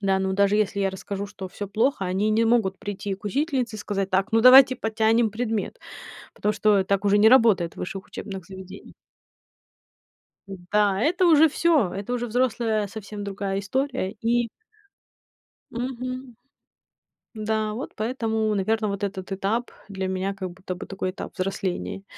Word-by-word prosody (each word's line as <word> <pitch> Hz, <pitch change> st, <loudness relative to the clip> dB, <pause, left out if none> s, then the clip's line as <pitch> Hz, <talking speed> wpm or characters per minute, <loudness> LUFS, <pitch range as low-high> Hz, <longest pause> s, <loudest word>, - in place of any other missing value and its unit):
Да, 195 Hz, -1 st, +2 dB
но 190 Hz, 0 st, -1 dB
даже 200 Hz, +1 st, +3 dB
если 200 Hz, -1 st, 0 dB
я 195 Hz, -1 st, +1 dB
расскажу, 200 Hz, +1 st, -5 dB
что 195 Hz, -2 st, -8 dB
всё 205 Hz, -, -6 dB
плохо, 220 Hz, +2 st, 0 dB
они 190 Hz, +4 st, 0 dB
не 220 Hz, +2 st, +3 dB
могут 225 Hz, -5 st, +2 dB
прийти 200 Hz, -1 st, -4 dB
к 195 Hz, -, -18 dB
учительнице 255 Hz, -1 st, -1 dB
и -, -, -8 dB
сказать: 195 Hz, -2 st, -3 dB
"Так, 190 Hz, +3 st, 0 dB
ну, 225 Hz, -, +4 dB
давайте 255 Hz, +1 st, +8 dB
потянем 220 Hz, 0 st, +2 dB
предмет." 225 Hz, -, -3 dB, 0.6 s
Потому 210 Hz, 0 st, -1 dB
что 210 Hz, -2 st, +3 dB
так 200 Hz, +1 st, 0 dB
уже 205 Hz, 0 st, +4 dB
не 220 Hz, +2 st, +6 dB
работает 220 Hz, -9 st, +4 dB
в -, -, -22 dB
высших 195 Hz, +1 st, -5 dB
учебных 190 Hz, -4 st, -7 dB
заведениях. 190 Hz, -1 st, -11 dB, 1.5 s
Н-да, 195 Hz, +1 st, 0 dB
это 345 Hz, +9 st, +2 dB
уже 320 Hz, -1 st, +6 dB
всё. 300 Hz, -, +2 dB
Это 200 Hz, +5 st, -5 dB
уже 240 Hz, 0 st, -1 dB
взрослая 225 Hz, -3 st, 0 dB
совсем 205 Hz, 0 st, -7 dB
другая 195 Hz, -1 st, -3 dB
история 260 Hz, 0 st, -2 dB
и 230 Hz, +2 st, 0 dB, 1.2 s
Мгм. 255 Hz, 0 st, -5 dB, 1.0 s
Да, 215 Hz, -1 st, -1 dB
вот 250 Hz, +6 st, -6 dB
поэтому, 220 Hz, -2 st, -1 dB
наверно, 215 Hz, +2 st, 0 dB
вот 200 Hz, 0 st, -4 dB
этот 195 Hz, -1 st, -4 dB
этап 210 Hz, +5 st, -1 dB, 0.2 s
для 190 Hz, -1 st, -3 dB
меня 190 Hz, +1 st, -2 dB
как 190 Hz, -2 st, -6 dB
будто 185 Hz, +1 st, -7 dB
бы 180 Hz, -, -8 dB
такой 190 Hz, -1 st, -4 dB
этап 185 Hz, -, -8 dB
взросления. 190 Hz, 0 st, -3 dB
210 Hz, 160 wpm, -24 LUFS, 195-230 Hz, 1.5 s, давайте